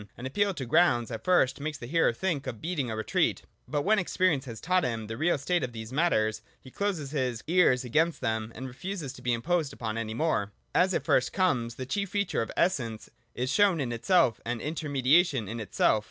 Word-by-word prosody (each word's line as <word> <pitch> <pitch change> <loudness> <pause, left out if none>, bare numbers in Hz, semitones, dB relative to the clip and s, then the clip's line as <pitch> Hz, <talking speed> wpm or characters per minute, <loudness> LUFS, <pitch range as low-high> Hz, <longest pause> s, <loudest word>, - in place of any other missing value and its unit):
An 125 - -7
appeal 200 +10 +1
to 135 - -4
grounds 120 -3 +3
at 115 - -5
first 180 -9 +3
makes 150 +1 -4
the 120 - -8
hearer 165 +4 +2
think 145 +1 -2
of 115 - -5
beating 155 -7 -2
a 110 - -3
retreat: 110 - 0 0.2
but 145 -1 -1
when 215 +1 +3
experience 175 -5 +1
has 115 -3 -7
taught 185 +1 +1
him 115 -6 -2
the 115 +1 -5
real 160 +6 +1
state 170 +3 0
of 125 -2 -4
these 110 +1 -7
matters, 110 -9 +1 0.2
he 130 - -14
closes 180 -8 -2
his 130 -6 -2
ears 160 -7 +3
against 160 +7 +1
them, 110 0 -2
and 130 +3 -6
refuses 150 +2 -6
to - - -13
be 125 - 0
imposed 150 +6 0
upon 110 -1 -4
any 110 -1 -4
more. 120 -9 0 0.2
122.] - - +4
As 185 +1 0
it - - -1
first 135 -5 +2
comes, 125 - +1
the 130 - -5
chief 200 +9 -2
feature 200 - 0
of 115 - -4
Essence 120 -11 0 0.2
is 125 +2 -1
show 200 +6 +4
in 135 -5 -2
itself 120 - +2
and 120 0 -3
intermediation 145 - +2
in 115 +3 -5
itself. 110 0 +2
135 Hz, 215 wpm, -28 LUFS, 115-175 Hz, 0.2 s, 122